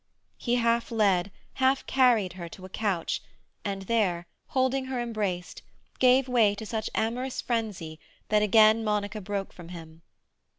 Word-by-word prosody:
He 240 Hz, -1 st, 0 dB
half 235 Hz, -1 st, +1 dB
led, 200 Hz, -5 st, +2 dB, 0.3 s
half 265 Hz, +1 st, +3 dB
carried, 235 Hz, -9 st, +3 dB
her 175 Hz, -2 st, -7 dB
to 185 Hz, +2 st, -11 dB
a -, -, -10 dB
couch, 190 Hz, -4 st, -1 dB, 0.4 s
and 195 Hz, -1 st, -3 dB
there, 190 Hz, -5 st, 0 dB, 0.2 s
holding 260 Hz, 0 st, +1 dB
her 260 Hz, -1 st, -3 dB
embraced, 210 Hz, -7 st, -3 dB, 0.4 s
gave 255 Hz, +1 st, +5 dB
way 225 Hz, -5 st, +3 dB
to 220 Hz, +2 st, -7 dB
such 220 Hz, 0 st, -3 dB
amorous 245 Hz, +4 st, -1 dB
frenzy 205 Hz, -10 st, -3 dB, 0.3 s
that 210 Hz, 0 st, +3 dB
again 215 Hz, +1 st, +5 dB
Monica 210 Hz, 0 st, -1 dB
broke 200 Hz, 0 st, -4 dB
from 170 Hz, -1 st, -11 dB
him. 165 Hz, -2 st, -10 dB
215 Hz, 145 wpm, -27 LUFS, 190-235 Hz, 0.4 s, gave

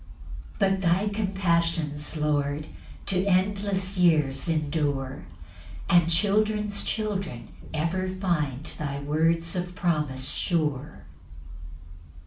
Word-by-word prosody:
8 -, -, -16 dB
But 195 Hz, -2 st, +2 dB
thy 190 Hz, +3 st, +2 dB
compassions, 170 Hz, -7 st, 0 dB
Lord, 150 Hz, -1 st, 0 dB, 0.4 s
To 185 Hz, -1 st, +2 dB
endless 195 Hz, 0 st, +1 dB
years 155 Hz, -3 st, +3 dB
endure; 145 Hz, -4 st, -1 dB, 0.6 s
And 175 Hz, -1 st, +5 dB
children's 210 Hz, +3 st, +1 dB
children 195 Hz, -, -3 dB, 0.2 s
ever 170 Hz, +4 st, -1 dB
find 165 Hz, -8 st, -1 dB
Thy 140 Hz, -4 st, -3 dB
words 165 Hz, +4 st, +1 dB
of 180 Hz, 0 st, -3 dB
promise 150 Hz, -8 st, 0 dB
sure. 150 Hz, -4 st, -1 dB
170 Hz, 95 wpm, -26 LUFS, 150-190 Hz, 0.6 s, And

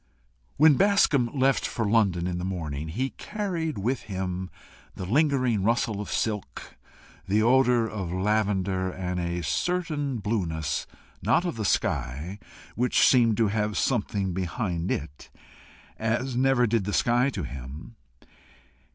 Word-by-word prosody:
When 150 Hz, -1 st, +6 dB
Bascombe 185 Hz, -11 st, +3 dB
left 135 Hz, -1 st, +2 dB
for 115 Hz, -, -2 dB
London 100 Hz, -5 st, +2 dB
in 90 Hz, -1 st, -2 dB
the -, -, -4 dB
morning, 80 Hz, -5 st, -4 dB
he 130 Hz, +12 st, -2 dB
carried 180 Hz, -, -3 dB
with 115 Hz, +6 st, -1 dB
him 95 Hz, -1 st, -3 dB, 0.5 s
the 95 Hz, -, -5 dB
lingering 130 Hz, -, +2 dB
rustle 110 Hz, -1 st, 0 dB
of 105 Hz, -, -7 dB
silk, 105 Hz, -3 st, -3 dB, 0.5 s
the 105 Hz, +3 st, +2 dB
odour 125 Hz, -1 st, +4 dB
of 100 Hz, -6 st, -4 dB
lavender, 95 Hz, -1 st, 0 dB
and 90 Hz, -1 st, -3 dB
a 85 Hz, 0 st, -2 dB
certain 155 Hz, -, -1 dB
blueness, 85 Hz, -9 st, -2 dB, 0.3 s
not 175 Hz, -, +2 dB
of 175 Hz, -, -2 dB
the 110 Hz, -, -3 dB
sky, 75 Hz, +7 st, -1 dB, 0.3 s
which 125 Hz, +2 st, +3 dB
seemed 115 Hz, -4 st, +4 dB
to 115 Hz, -3 st, +3 dB
have 105 Hz, 0 st, -1 dB
something 100 Hz, -6 st, 0 dB
behind 90 Hz, -1 st, -2 dB
it, 75 Hz, -1 st, -4 dB, 0.7 s
as 120 Hz, +3 st, -1 dB
never 130 Hz, -1 st, +3 dB
did 110 Hz, -3 st, 0 dB
the 105 Hz, -, -3 dB
sky 120 Hz, +2 st, +3 dB
to 100 Hz, -9 st, -4 dB
him. 70 Hz, -, -8 dB
105 Hz, 135 wpm, -26 LUFS, 90-125 Hz, 0.7 s, When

